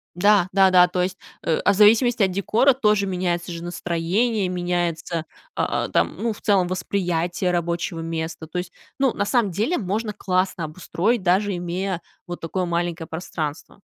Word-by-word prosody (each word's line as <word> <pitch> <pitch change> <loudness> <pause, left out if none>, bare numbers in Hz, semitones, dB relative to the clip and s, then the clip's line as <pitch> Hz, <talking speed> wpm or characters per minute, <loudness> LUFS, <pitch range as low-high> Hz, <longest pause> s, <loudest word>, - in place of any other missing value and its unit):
Да, 200 0 +4
да 195 0 +5
да. 180 -1 +7
То 180 0 -1
есть, 185 0 -3 0.3
э, 160 - +1
в 200 - +5
зависимости 220 +2 +5
от 190 - +2
декора 225 +8 +3
тоже 210 -5 +2
меняется 180 -2 -2
же 170 0 -6
настроение, 180 +5 0
меняется, 175 -2 -2 0.3
а, - - 0
а, - - -7
там, 85 - +1
ну, 225 +2 -1
в - - -15
целом, 195 -4 +3
восприятие 180 -1 -1
рабочего 170 -1 -2
места. 165 0 -4
То 165 - -6
есть, 180 0 -4 0.3
ну, 270 -3 +3
на 205 - -1
самом 225 -3 +1
деле 220 - 0
можно 210 +2 -2
классно 185 -3 -1
обустроить, 185 +7 -1
даже 190 +2 +2
имея 175 +1 -3 0.3
вот 175 0 -6
такое 180 +3 -2
маленькое 170 -1 -2
пространство. 160 +1 -5
180 Hz, 170 wpm, -23 LUFS, 170-200 Hz, 0.3 s, да